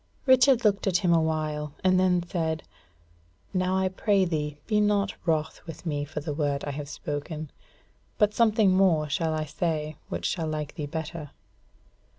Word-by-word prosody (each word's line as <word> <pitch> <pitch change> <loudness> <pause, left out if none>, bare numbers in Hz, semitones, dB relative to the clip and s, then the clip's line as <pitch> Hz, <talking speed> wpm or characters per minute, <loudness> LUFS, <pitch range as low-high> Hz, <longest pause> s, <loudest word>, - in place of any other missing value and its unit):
Richard 260 -2 +5
looked 200 -1 +2
at 185 -2 +3
him 170 - +5
a 165 - +4
while; 155 -2 -2
and 185 0 +4
then 180 -2 +3
said: 160 -3 -2 0.9
"Now, 185 0 +1
I 190 0 +2
pray 195 +1 +2
thee 150 -3 -2
be 210 -2 +2
not 205 -1 +2
wroth 160 -1 0
with 165 +2 -9
me 145 -3 -1
for 150 +1 -5
the 150 0 -3
word 145 -2 -1
I 145 - -3
have 145 0 -6
spoken. 150 +1 -5 0.7
But 210 -1 +3
something 220 -3 +4
more 170 -6 +3
shall 160 +1 0
I 155 0 -2
say, 155 -1 -2
which 85 0 -4
shall 160 - -1
like 150 -1 -3
thee 150 - -5
better. 160 0 -5
160 Hz, 170 wpm, -27 LUFS, 150-190 Hz, 0.9 s, Richard